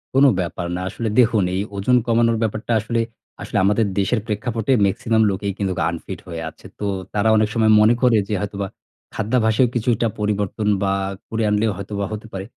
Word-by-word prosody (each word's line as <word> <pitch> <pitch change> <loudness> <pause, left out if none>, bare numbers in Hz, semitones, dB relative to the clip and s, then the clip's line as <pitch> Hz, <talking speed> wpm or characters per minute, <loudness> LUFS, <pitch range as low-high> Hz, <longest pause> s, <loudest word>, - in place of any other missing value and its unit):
কোন 135 +1 +6
ব্যাপার 90 0 -3
না। 90 - -3
আসলে 110 +3 -3
দেখুন 115 -4 +4
এই 95 - 0
ওজন 105 +6 +3
কমানোর 115 0 +3
ব্যাপারটা 110 +1 -3
আসলে, 115 +2 -1 0.4
আসলে - - -3
আমাদের 105 +2 +3
দেশের 105 +5 +1
প্রেক্ষাপটে 110 +2 -2
মেক্সিমাম 110 +3 +1
লোকেই 100 +1 -3
কিন্তু 95 -2 -1 0.2
আনফিট 85 -1 -6
হয়ে 85 -2 -5
আছে। - - -20
তো 105 - -3 0.3
তারা 105 +1 +2
অনেক 105 -1 +2
সময় 110 -1 +3
মনে 110 +2 +6
করে 125 -3 +4
যে, 105 - -3
হয়তোবা 100 -1 -3 0.5
খাদ্যাভাসও 110 +2 +2
কিছুটা 120 -1 +1
পরিবর্তন 105 0 -1 0.2
বা 95 0 +1 0.4
করে 115 0 -1
আনলেও 105 +1 +2
হয়তো 100 +1 -7 0.2
হতে 110 +1 -7
পারে। 95 0 -5
110 Hz, 175 wpm, -21 LUFS, 100-115 Hz, 0.5 s, কোন